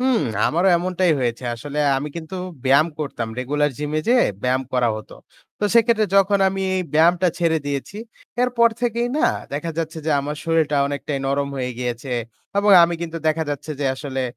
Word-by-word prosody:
হুম, 255 -2 +2 0.3
আমারও 175 +4 +2
এমনটাই 180 0 +1
হয়েছে। 120 0 -2
আসলে 145 +6 -6 0.2
আমি 145 +3 -3
কিন্তু 165 +3 -6 0.3
ব্যায়াম 140 +4 +5
করতাম। 135 -6 -4
regular 145 +3 0
gym-এ 150 +1 -1
যেয়ে 245 0 +5 0.2
ব্যায়াম 130 +1 +1
করা 125 -2 +2
হতো। 110 - -10 0.4
তো 210 - -1
সেক্ষেত্রে 230 -2 +4
যখন 195 +1 +4
আমি 195 0 -4
এই 185 - 0
ব্যায়ামটা 175 +3 +4
ছেড়ে 165 -2 +2
দিয়েছি, 140 +8 -4 0.5
এরপর 235 -2 +4
থেকেই 240 0 0
না - - +4 0.3
দেখা 150 +4 -3
যাচ্ছে 160 0 -3
যে, - - +1
আমার 150 +2 -4
শরীরটা 160 -3 +1
অনেকটাই 145 0 -3
নরম 140 +1 0
হয়ে 125 -1 -2
গিয়েছে 125 +1 -4 0.5
এবং 205 0 +3
আমি 170 - -1
কিন্তু 165 -1 -5
দেখা 160 +1 0
যাচ্ছে 145 +2 -5
যে 140 - 0
আসলে 135 -1 -4
155 Hz, 175 wpm, -21 LUFS, 140-185 Hz, 0.5 s, ব্যায়াম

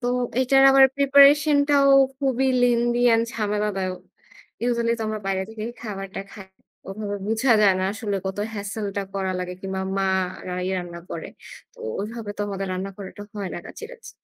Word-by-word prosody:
তো 245 - -3 0.3
এইটার 270 +1 +4
আবার 270 0 +7
preparation 280 +2 +6
টাও 280 -1 +5 0.3
খুবই 265 -1 +1 0.2
lengthy 240 0 +2
and 225 - +2
ঝামেলাদায়ক। 205 -4 -2 0.7
Usually 235 -1 +1
তো - - -3
আমরা 215 0 -3
বাইরে 190 -1 0
থেকেই 220 +1 -5
খাবারটা 195 -3 -6
খাই। 195 -2 -11 0.4
ওভাবে 205 +1 -4
বোঝা 225 +3 +2
যায় 195 -2 +5
না 185 - 0
আসলে 210 -2 -3
কত 190 +1 -4 0.2
hassle 205 +1 -4
টা 200 - 0
করা 190 -1 -1
লাগে 180 0 -4
কিংবা 190 0 -4 0.2
মা 195 0 +1 0.4
রা 180 - -4
এই 185 - -2
রান্না 175 -1 -7
করে। 165 - -6 0.5
তো - - -23 0.2
ওইভাবে 215 +1 -6
তো - - -6
আমাদের 195 -1 -4
রান্না 185 +2 -4
করাটা 200 0 -9
হয় 200 -2 -4
না - - -4
কাছে - - -9
কাছে। 480 -1 -12
210 Hz, 175 wpm, -23 LUFS, 195-245 Hz, 0.7 s, আবার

